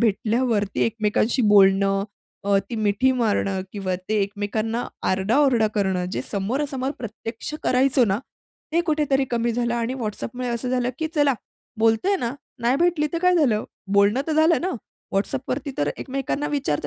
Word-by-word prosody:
भेटल्यावरती 220 Hz, -1 st, +1 dB
एकमेकांशी 225 Hz, +2 st, +1 dB
बोलणं, 195 Hz, -1 st, +5 dB, 0.4 s
अ, 200 Hz, -1 st, +3 dB
ती -, -, -3 dB
मिठी 215 Hz, +4 st, +2 dB
मारणं, 205 Hz, -5 st, 0 dB
किंवा 190 Hz, -3 st, -2 dB
ते 215 Hz, -, 0 dB
एकमेकांना 215 Hz, +3 st, -2 dB, 0.2 s
आरडा-ओरडा 225 Hz, +5 st, +3 dB
करणं. 190 Hz, -3 st, 0 dB
जे -, -, -2 dB
समोरासमोर 260 Hz, +6 st, -2 dB
प्रत्यक्ष 230 Hz, +4 st, -6 dB
करायचो 255 Hz, 0 st, +3 dB
ना, 200 Hz, 0 st, 0 dB, 0.5 s
ते 340 Hz, -, +3 dB
कुठेतरी 285 Hz, -3 st, +2 dB
कमी 235 Hz, 0 st, 0 dB
झालं. 240 Hz, 0 st, 0 dB
आणि 235 Hz, +2 st, -1 dB
WhatsAppमुळे 245 Hz, +1 st, -4 dB
असं 240 Hz, +1 st, -2 dB
झालं, 250 Hz, -1 st, +1 dB
की 320 Hz, -, -1 dB
"चला 290 Hz, -3 st, +3 dB, 0.4 s
बोलतोय 225 Hz, -, +3 dB
ना. 240 Hz, -4 st, -3 dB, 0.3 s
नाही 245 Hz, +3 st, +3 dB
भेटली 340 Hz, -2 st, +2 dB
तर 335 Hz, -, 0 dB
काय 360 Hz, 0 st, +5 dB
झालं? 240 Hz, -10 st, +2 dB, 0.3 s
बोलणं 205 Hz, +6 st, +4 dB
तर 315 Hz, -, -1 dB
झालं 315 Hz, +2 st, +4 dB
ना?" 370 Hz, +2 st, -1 dB, 0.4 s
WhatsAppवरती 265 Hz, +7 st, -2 dB
तर 145 Hz, -, +1 dB
एकमेकांना 275 Hz, +2 st, -3 dB
विचारत 150 Hz, -, -1 dB
235 Hz, 150 wpm, -23 LUFS, 205-270 Hz, 0.5 s, बोलणं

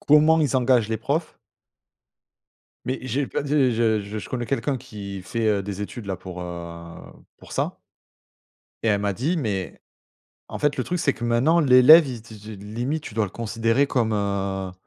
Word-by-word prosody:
comment 155 Hz, +2 st, +5 dB
ils 140 Hz, -3 st, +1 dB
engagent 125 Hz, -3 st, +3 dB
les 110 Hz, -, -1 dB
profs 145 Hz, +9 st, -3 dB, 1.5 s
mais 130 Hz, -, -2 dB
j'ai 130 Hz, +3 st, -1 dB
pas -, -, -3 dB
des 140 Hz, -3 st, +2 dB
je 110 Hz, -2 st, +2 dB
je 105 Hz, +2 st, -6 dB
je -, -, -8 dB
connais 120 Hz, -2 st, -3 dB
quelqu'un 140 Hz, 0 st, -1 dB
qui 100 Hz, -5 st, -8 dB
fait, 110 Hz, +4 st, -2 dB
heu, 100 Hz, -2 st, +1 dB
des 100 Hz, 0 st, -6 dB
études 110 Hz, +3 st, -6 dB
là 95 Hz, -2 st, -3 dB
pour, 90 Hz, 0 st, -8 dB
heu, 85 Hz, -1 st, -8 dB, 0.4 s
pour -, -, -14 dB
ça -, -, -2 dB, 1.1 s
et 115 Hz, -, +3 dB
elle 100 Hz, -1 st, +2 dB
m'a 100 Hz, -1 st, -1 dB
dit: 155 Hz, -, -1 dB
«Mais 100 Hz, -8 st, -3 dB, 0.7 s
en -, -, -6 dB
fait 145 Hz, -1 st, +1 dB
le 130 Hz, -, -1 dB
truc 180 Hz, -, -2 dB
c'est 140 Hz, -, +2 dB
que -, -, -9 dB
maintenant 120 Hz, +8 st, +3 dB
l'élève, 145 Hz, +2 st, +8 dB
il 120 Hz, -4 st, -6 dB
te 115 Hz, -1 st, -13 dB
de 105 Hz, -1 st, -10 dB
limite 125 Hz, +9 st, -3 dB
tu 105 Hz, -, -8 dB
dois 110 Hz, -1 st, +1 dB
le -, -, -8 dB
considérer 115 Hz, +4 st, 0 dB
comme, 115 Hz, -5 st, 0 dB
heu» 100 Hz, -2 st, -2 dB
115 Hz, 190 wpm, -24 LUFS, 100-135 Hz, 1.5 s, l'élève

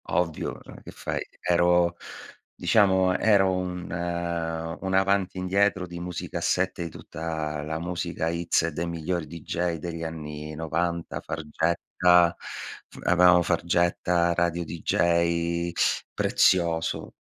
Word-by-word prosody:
Ovvio, 85 Hz, -3 st, -1 dB
cioè, -, -, -13 dB
che -, -, -12 dB
fai? -, -, -4 dB, 0.2 s
Ero 85 Hz, 0 st, +3 dB, 0.6 s
diciamo 95 Hz, -1 st, +3 dB
ero 100 Hz, -3 st, +4 dB
un 90 Hz, -1 st, -3 dB, 1.0 s
un 95 Hz, 0 st, -2 dB
avanti 95 Hz, 0 st, +2 dB
indietro 95 Hz, +1 st, +1 dB
di 85 Hz, 0 st, -7 dB
musicassette 90 Hz, 0 st, -2 dB
di 85 Hz, -, -4 dB
tutta 80 Hz, -2 st, -5 dB
la 80 Hz, +1 st, -3 dB
musica 85 Hz, -1 st, -2 dB
X 85 Hz, -1 st, +1 dB
dei 85 Hz, +2 st, -3 dB
migliori 85 Hz, 0 st, -2 dB
DJ 85 Hz, +2 st, -3 dB
degli 85 Hz, +1 st, -5 dB
anni 75 Hz, -1 st, -6 dB
90' 85 Hz, +2 st, -2 dB
Fargetta 85 Hz, +2 st, +2 dB, 0.5 s
F -, -, -16 dB
avevamo 90 Hz, 0 st, +6 dB
Fargetta, 85 Hz, 0 st, +1 dB
Radio 85 Hz, 0 st, 0 dB
Dee-Jay, 85 Hz, +1 st, +1 dB, 0.4 s
Prezioso, 85 Hz, -3 st, +1 dB
85 Hz, 110 wpm, -26 LUFS, 80-90 Hz, 1.0 s, avevamo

